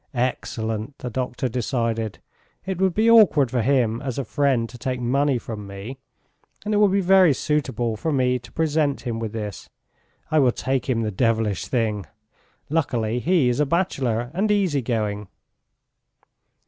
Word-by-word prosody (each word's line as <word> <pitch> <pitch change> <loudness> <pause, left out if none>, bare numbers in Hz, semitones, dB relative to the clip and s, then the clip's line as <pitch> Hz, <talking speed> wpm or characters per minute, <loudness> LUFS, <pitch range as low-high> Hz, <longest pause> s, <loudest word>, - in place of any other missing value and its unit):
"Excellent," 115 -1 -2
the 125 - -6
doctor 130 +1 -2
decided, 115 -2 -2 0.5
"it 190 -1 -3
would 190 -2 +2
be 220 +2 +3
awkward 195 - +6
for 125 - +1
him 120 -2 +1
as 130 -3 -4
a 140 - -2
friend 135 -4 +1
to 115 - -14
take 130 0 -2
money 135 +3 +1
from 110 -3 -7
me, 100 +7 -8 0.7
and 215 - -1
it - - +3
will 210 0 +5
be 195 +1 +2
very 185 -5 +5
suitable 130 -7 -1
for 160 +9 -2
me 125 -2 +1
to 120 - -15
present 155 -3 0
him 120 -3 -3
with 110 -2 -4
this. 105 -3 -6 0.6
I 155 - +4
will 130 -4 +4
take 135 0 -2
him 115 -3 +1
the 105 - -2
devilish 110 -2 0
thing! 110 -5 -1 0.6
Luckily 125 -7 0
he 165 -1 +2
is 125 +1 0
a 150 - +3
bachelor 130 -9 -1
and 200 +5 0
easy 190 -9 +2
going." 105 -4 -2
125 Hz, 165 wpm, -23 LUFS, 115-150 Hz, 0.7 s, awkward